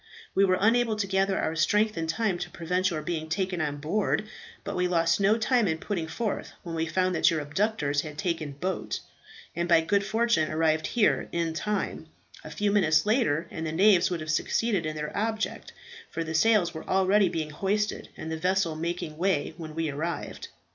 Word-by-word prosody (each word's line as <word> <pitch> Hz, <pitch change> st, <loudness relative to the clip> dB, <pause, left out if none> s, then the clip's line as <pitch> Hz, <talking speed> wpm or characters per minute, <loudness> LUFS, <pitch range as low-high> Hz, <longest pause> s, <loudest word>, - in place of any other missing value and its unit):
We 195 Hz, -, +4 dB
were 185 Hz, -1 st, +2 dB
unable 225 Hz, +1 st, +3 dB
to 210 Hz, -1 st, -1 dB
gather 195 Hz, 0 st, +1 dB
our 160 Hz, -, -1 dB
strength 210 Hz, +7 st, +2 dB
in 165 Hz, -1 st, -2 dB
time 190 Hz, +1 st, 0 dB
to -, -, -4 dB
prevent 180 Hz, +2 st, 0 dB
your 155 Hz, -4 st, -3 dB
being 160 Hz, -1 st, -3 dB
taken 185 Hz, 0 st, -1 dB
on 145 Hz, -2 st, -2 dB
board, 200 Hz, +7 st, 0 dB, 0.4 s
but -, -, -4 dB
we 180 Hz, 0 st, +1 dB
lost 170 Hz, 0 st, +2 dB
no 200 Hz, +3 st, +4 dB
time 230 Hz, -1 st, +2 dB
in 160 Hz, -2 st, 0 dB
putting 170 Hz, -2 st, -3 dB
forth 215 Hz, +5 st, -3 dB
when 170 Hz, -, -6 dB
we 165 Hz, 0 st, -1 dB
found 185 Hz, +3 st, +1 dB
that 160 Hz, -, +4 dB
your 165 Hz, -, 0 dB
abductors 150 Hz, -2 st, 0 dB
had 150 Hz, -1 st, -8 dB
taken 165 Hz, -5 st, -2 dB
boat, 180 Hz, +6 st, -3 dB, 0.5 s
and 170 Hz, +1 st, -1 dB
by 165 Hz, -1 st, +6 dB
good 200 Hz, +5 st, +1 dB
fortune 225 Hz, -6 st, +1 dB
arrived 155 Hz, 0 st, +1 dB
here 230 Hz, -4 st, +2 dB
in 170 Hz, -1 st, -1 dB
time; 210 Hz, +5 st, -3 dB, 0.4 s
a -, -, -8 dB
few 205 Hz, 0 st, 0 dB
minutes 160 Hz, -6 st, +3 dB
later, 210 Hz, -, +1 dB
and 160 Hz, 0 st, -4 dB
the -, -, -2 dB
knaves 185 Hz, +2 st, +5 dB
would 175 Hz, -3 st, -3 dB
have 155 Hz, 0 st, -2 dB
succeeded 195 Hz, +2 st, 0 dB
in 155 Hz, -, -4 dB
their 150 Hz, 0 st, -5 dB
object, 220 Hz, +1 st, -2 dB, 0.4 s
for 165 Hz, -, -3 dB
the 160 Hz, 0 st, -5 dB
sails 185 Hz, 0 st, +3 dB
were 160 Hz, -, -8 dB
already 190 Hz, +1 st, +4 dB
being 160 Hz, -3 st, -3 dB
hoisted, 205 Hz, +6 st, -1 dB
and 160 Hz, -, -6 dB
the 160 Hz, -, -2 dB
vessel 180 Hz, -1 st, +1 dB
making 165 Hz, -1 st, -4 dB
way, 180 Hz, -5 st, +1 dB
when 155 Hz, -3 st, -8 dB
we 165 Hz, 0 st, -1 dB
arrived. 160 Hz, +4 st, -4 dB
175 Hz, 200 wpm, -27 LUFS, 160-205 Hz, 0.5 s, by